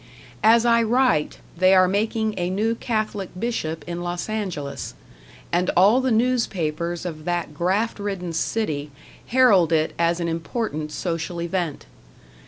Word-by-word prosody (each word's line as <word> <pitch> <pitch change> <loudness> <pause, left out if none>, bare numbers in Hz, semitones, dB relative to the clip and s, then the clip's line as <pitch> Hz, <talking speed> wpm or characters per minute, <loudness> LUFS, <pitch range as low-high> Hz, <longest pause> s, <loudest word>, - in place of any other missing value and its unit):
As 230 +2 +5
I 235 -1 +4
write, 240 -8 +2 0.2
they 185 +2 +5
are 185 0 +6
making 215 +3 0
a 175 -1 -1
new 215 +5 0
Catholic 215 -4 -2
bishop 165 -9 -3
in 175 0 -5
Los 175 +3 -4
Angeles, 185 -10 -4 0.6
and 180 +1 +1
all 205 +8 +6
the 260 - 0
newspapers 180 -9 0
of 155 -3 -6
that 175 -3 -2
graft 190 +9 0
ridden 195 -4 -4
city 155 -5 -2 0.4
herald 215 -9 +4
it 160 -1 +1
as 170 +1 +2
an 170 - -1
important 165 -1 -3
social 170 +1 -3
event. 170 -3 -3
185 Hz, 140 wpm, -23 LUFS, 170-220 Hz, 0.6 s, are